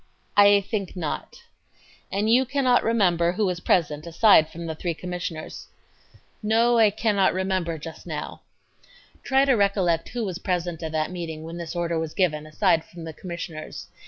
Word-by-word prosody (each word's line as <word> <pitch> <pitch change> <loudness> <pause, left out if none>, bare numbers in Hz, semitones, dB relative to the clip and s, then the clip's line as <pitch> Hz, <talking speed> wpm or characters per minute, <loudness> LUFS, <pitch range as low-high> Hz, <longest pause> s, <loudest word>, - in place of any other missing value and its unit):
A. 205 0 +7
I - - 0
think 200 -1 -4
not. 165 -5 -4
Q. - - -15 0.7
And 205 +2 0
you 240 +4 +5
cannot 255 -2 +2
remember 180 -7 +2
who 210 +3 0
was 180 -2 -1
present 155 -3 0
aside 170 -1 +5
from 170 +1 -8
the 160 - -3
three 170 +1 -3
Commissioners? 175 -2 -6
A. - - -31 0.2
No, 230 +2 +3
I 220 -2 +6
cannot 205 -3 +1
remember 185 -3 -1
just 160 +1 -10
now. - - -6 0.4
Q. - - -28 0.3
Try 270 0 +3
to 275 - +4
recollect 195 -6 +1
who 240 -2 -3
was 185 -2 -4
present 175 -2 -2
at 160 -1 -4
that 155 +2 -1
meeting 165 -3 -6
when 165 +1 -7
this 170 0 -6
order 170 -1 -1
was 160 -1 -5
given, 155 -5 0
aside 160 +1 +2
from 170 0 -12
the 160 -1 -7
Commissioners. 170 -2 -7
180 Hz, 185 wpm, -24 LUFS, 165-205 Hz, 0.7 s, A